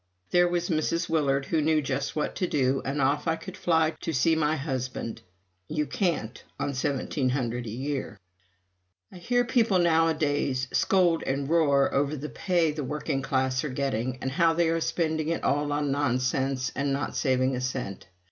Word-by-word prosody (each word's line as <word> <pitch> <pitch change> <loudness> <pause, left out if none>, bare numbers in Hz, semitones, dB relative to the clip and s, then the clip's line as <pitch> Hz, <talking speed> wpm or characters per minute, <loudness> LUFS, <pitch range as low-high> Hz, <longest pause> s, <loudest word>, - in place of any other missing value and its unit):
There 175 0 +5
was 175 0 -1
Mrs. 165 +1 0
Willard 140 -4 +1
who 160 +1 +1
knew 155 +1 +3
just 140 -1 -2
what 150 - -2
to 180 - 0
do, 135 -3 +1
and 140 +2 -2
off 140 +4 +1
I 165 - +2
could 165 - -9
fly 160 -2 +2
to 165 - -2
see 160 +4 +3
my 155 0 +1
husband. 130 -5 -4 0.5
You 150 -1 -1
can't, 145 - -2 0.2
on 145 - -1
$1700 130 -3 -1
a - - -4
year. 130 -2 -4 0.9
I - - -11
hear 245 +8 +1
people 230 -6 +3
nowadays 155 -6 +2
scold 175 -4 +3
and 135 +1 -2
roar 145 -4 +3
over 145 +2 +1
the 150 +1 -6
pay 175 -4 +1
the 150 0 -4
working 135 0 -2
classes 130 -1 0
are 150 - -2
getting, 130 -2 -2
and 130 - -1
how 165 +3 +3
they 165 0 +2
are 165 0 0
spending 160 -2 -1
it 165 - -2
all 145 +1 +1
on 145 -1 0
nonsense 130 -1 0
and 140 0 0
not 140 +1 -2
saving 130 -1 +1
a 125 - -3
cent. 125 -8 -4
145 Hz, 175 wpm, -27 LUFS, 130-160 Hz, 0.9 s, There